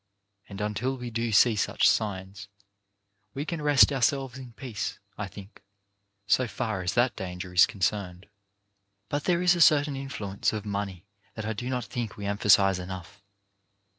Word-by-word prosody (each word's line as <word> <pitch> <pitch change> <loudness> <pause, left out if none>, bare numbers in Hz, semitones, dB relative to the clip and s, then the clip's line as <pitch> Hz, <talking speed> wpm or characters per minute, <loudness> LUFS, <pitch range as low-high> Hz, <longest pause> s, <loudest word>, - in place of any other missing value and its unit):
And 100 -1 -8
until 115 +6 -2
we 125 -1 -6
do 115 0 -2
see 110 +2 +5
such 100 - +2
signs, 100 -1 -1 0.9
we 140 +2 -3
can 165 -1 -4
rest 140 -6 +5
ourselves 135 -1 0
in 130 -3 -10
peace, 115 -3 -5 0.2
I 105 - -4
think, 100 +2 -13 0.6
so 125 +5 +2
far 110 -2 -3
as 90 +2 -2
that 120 0 +2
danger 90 -1 -6
is 90 - +7
concerned. 95 -2 -2 0.8
But 145 +2 -2
there 175 -1 +2
is 180 0 +5
a 175 - -1
certain 145 -2 +5
influence 110 -9 -3
of 110 -1 -4
money 100 -3 -4 0.3
that 110 - -5
I 110 - -1
do 120 +4 -5
not 125 -1 -2
think 120 -5 -5
we 100 - -6
emphasize 100 -2 +4
enough. 95 +2 -8
105 Hz, 165 wpm, -27 LUFS, 100-130 Hz, 0.9 s, is